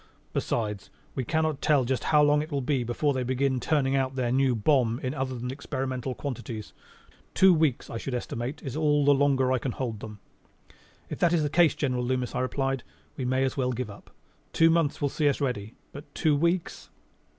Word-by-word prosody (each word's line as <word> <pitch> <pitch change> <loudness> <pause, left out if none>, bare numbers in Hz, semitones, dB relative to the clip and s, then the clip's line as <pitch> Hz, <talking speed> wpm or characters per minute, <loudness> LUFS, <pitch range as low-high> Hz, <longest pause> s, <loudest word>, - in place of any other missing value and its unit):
Besides, 105 -4 -2 0.2
we 130 - -2
cannot 155 0 0
tell 145 -5 +3
just 130 +1 -1
how 150 -1 +4
long 145 0 +4
it 155 +2 -7
will 140 -1 -1
be 130 -1 0
before 130 +5 0
they 130 - -1
begin 130 +1 0
turning 140 0 +1
out 130 -1 0
their 125 -2 0
new 130 -1 +2
bomb 120 0 +2
in 130 +1 -1
other 130 -3 -3
than 125 +1 -4
experimental 130 -2 -4
quantities. 120 -6 -6 0.6
Two 190 -1 +7
weeks, 155 -6 +1
I 115 - -5
should 130 +1 -4
estimate, 120 +4 -4
is 135 -3 -5
about 155 - -2
all 145 -2 +3
the 145 - +6
longer 135 -2 +2
I 130 - +2
can 125 0 -3
hold 115 -5 -4
them." 105 -1 -8 0.9
"If - - -5
that 175 -1 +3
is 165 -3 +2
the 145 - -1
case, 170 -1 +4
General 125 -4 -1
Loomis," 125 0 -1
I 125 - -1
replied, 135 0 -1 0.3
"we 130 - -4
may 130 +1 +1
as 135 +1 -1
well 125 -1 0
give 120 -3 -4
up. 100 - -14 0.4
Two 165 0 +5
months 165 -4 +1
will 145 - +2
see 150 +1 +1
us 140 - -1
ready. 120 -6 -3 0.2
But 145 +2 -11
two 155 -2 +2
weeks 170 +4 -1
135 Hz, 210 wpm, -27 LUFS, 125-145 Hz, 0.9 s, Two